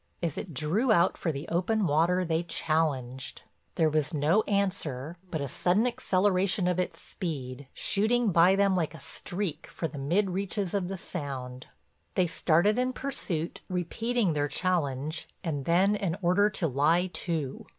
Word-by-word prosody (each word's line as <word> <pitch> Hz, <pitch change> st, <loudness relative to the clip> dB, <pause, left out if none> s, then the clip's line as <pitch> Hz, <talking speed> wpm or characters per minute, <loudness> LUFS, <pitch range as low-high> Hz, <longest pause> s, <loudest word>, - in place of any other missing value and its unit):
As 165 Hz, -4 st, -1 dB
it 195 Hz, -, -5 dB
drew 185 Hz, -, +1 dB
out 175 Hz, -3 st, +4 dB
for 165 Hz, -, -1 dB
the 140 Hz, +1 st, -6 dB
open 185 Hz, +5 st, +1 dB
water 170 Hz, +4 st, +2 dB
they 165 Hz, 0 st, +1 dB
challenged. 150 Hz, -6 st, -2 dB, 0.3 s
There 160 Hz, -, +3 dB
was 155 Hz, 0 st, 0 dB
no 155 Hz, +8 st, +3 dB
answer, 175 Hz, -7 st, -1 dB
but 160 Hz, -4 st, -2 dB
a 140 Hz, -, -2 dB
sudden 180 Hz, -, +2 dB
acceleration 190 Hz, -4 st, +1 dB
of 180 Hz, 0 st, +1 dB
its 180 Hz, -2 st, -2 dB
speed, 140 Hz, -7 st, -5 dB
shooting 220 Hz, +2 st, +1 dB
by 175 Hz, +3 st, +6 dB
them 200 Hz, -1 st, +3 dB
like 165 Hz, -3 st, -1 dB
a -, -, -10 dB
streak 170 Hz, +3 st, -4 dB
for 165 Hz, -, -4 dB
the 145 Hz, -, -8 dB
mid 180 Hz, +8 st, +1 dB
reaches 195 Hz, 0 st, -2 dB
of 195 Hz, -3 st, 0 dB
the 190 Hz, +1 st, -4 dB
Sound. 130 Hz, -8 st, -6 dB, 0.5 s
They 185 Hz, -, +4 dB
started 175 Hz, +6 st, +2 dB
in 255 Hz, +1 st, +1 dB
pursuit, 185 Hz, -, -3 dB
repeating 195 Hz, +3 st, 0 dB
their 145 Hz, -1 st, 0 dB
challenge 155 Hz, -3 st, -1 dB, 0.2 s
and 145 Hz, -5 st, -2 dB
then 190 Hz, +5 st, +4 dB
an 190 Hz, -5 st, -1 dB
order 190 Hz, +4 st, +4 dB
to 195 Hz, -5 st, -1 dB
lie 155 Hz, +6 st, +3 dB
to. 155 Hz, -6 st, -3 dB
175 Hz, 160 wpm, -29 LUFS, 150-195 Hz, 0.5 s, by